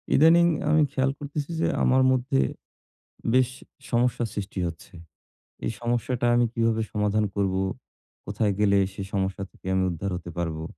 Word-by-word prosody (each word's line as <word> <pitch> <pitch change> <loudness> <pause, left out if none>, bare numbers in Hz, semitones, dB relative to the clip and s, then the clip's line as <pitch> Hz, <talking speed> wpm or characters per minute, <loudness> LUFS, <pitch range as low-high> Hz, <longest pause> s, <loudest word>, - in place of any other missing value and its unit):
ইদানিং 165 +3 +6 0.2
আমি 155 0 +4
খেয়াল 135 0 +1
করতেছি 145 +2 -4
যে - - +2 0.2
আমার 130 +1 +4
মধ্যে 125 - +1 1.0
বেশ 130 -1 +4 0.4
সমস্যা 120 0 +1
সৃষ্টি 100 -1 -5
হচ্ছে। 85 -1 -8 0.7
এই - - -1
সমস্যাটা 120 +1 -1
আমি 120 0 +4
কিভাবে 115 -1 +1
সমাধান 105 0 +1
করবো? 95 -2 0 0.7
কোথায় 105 +1 0
গেলে 100 -1 +4
সে 95 - -6
সমস্যা 95 -1 -1
থেকে - - -17
আমি 95 0 +2
উদ্ধার 90 +3 -3
হতে 90 -1 -8
পারবো? 80 -2 -3
110 Hz, 145 wpm, -26 LUFS, 100-125 Hz, 1.0 s, ইদানিং